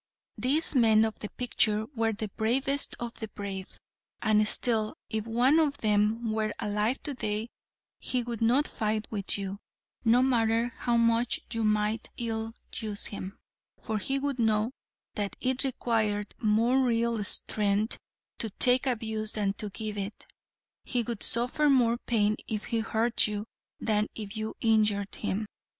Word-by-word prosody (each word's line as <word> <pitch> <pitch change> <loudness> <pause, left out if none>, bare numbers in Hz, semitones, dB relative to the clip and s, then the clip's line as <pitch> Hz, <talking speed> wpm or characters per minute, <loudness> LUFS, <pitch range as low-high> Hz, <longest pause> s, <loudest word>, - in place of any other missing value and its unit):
These 295 +6 +2
men 225 -4 +5
of 220 - -4
the 210 - -5
picture 220 -3 +1
were 225 -2 +1
the 215 0 -4
bravest 265 +7 0
of 235 -1 -4
the 220 - -4
brave, 195 -2 -7 0.4
and 215 -1 +3
still 220 -2 +3 0.2
if 220 0 -2
one 250 +7 +4
of 290 -3 +1
them 215 0 +1
were 215 -1 -1
alive 210 +5 -1
today 220 -5 -2 0.5
he 250 -1 -1
would 235 -1 -5
not 250 +6 +3
fight 215 0 -1
with 205 -2 -2
you, 195 0 -5 0.4
no 240 +2 +5
matter 230 -2 +2
how 240 -1 0
much 230 +1 +2
you 225 -1 -1
might 215 +1 +1
ill 225 -1 -3 0.2
use 210 -2 -3
him, 195 0 -6 0.4
for 220 -1 -3
he 270 +7 0
would 275 -2 -2
know 220 0 +2 0.4
that 205 -1 -3
it 260 +1 +1
required 220 -5 -1
more 230 +4 +3
real 235 -3 +1
strength 205 +1 +2 0.4
to 225 - -1
take 250 +6 +3
abuse 220 -3 0
than 200 -2 0
to 210 +1 -5
give 210 +1 -5
it. 200 +2 -6 0.6
He 245 -2 -1
would 230 -2 -5
suffer 250 +6 +2
more 240 -3 +3
pain 215 -4 +1
if 215 -1 -3
he 230 -2 -1
hurt 225 +1 +1
you 210 0 -4 0.3
than 210 -1 +1
if 210 -1 -6
you 220 0 -4
injured 210 -3 +2
him. 210 +1 -2
220 Hz, 155 wpm, -29 LUFS, 210-240 Hz, 0.6 s, men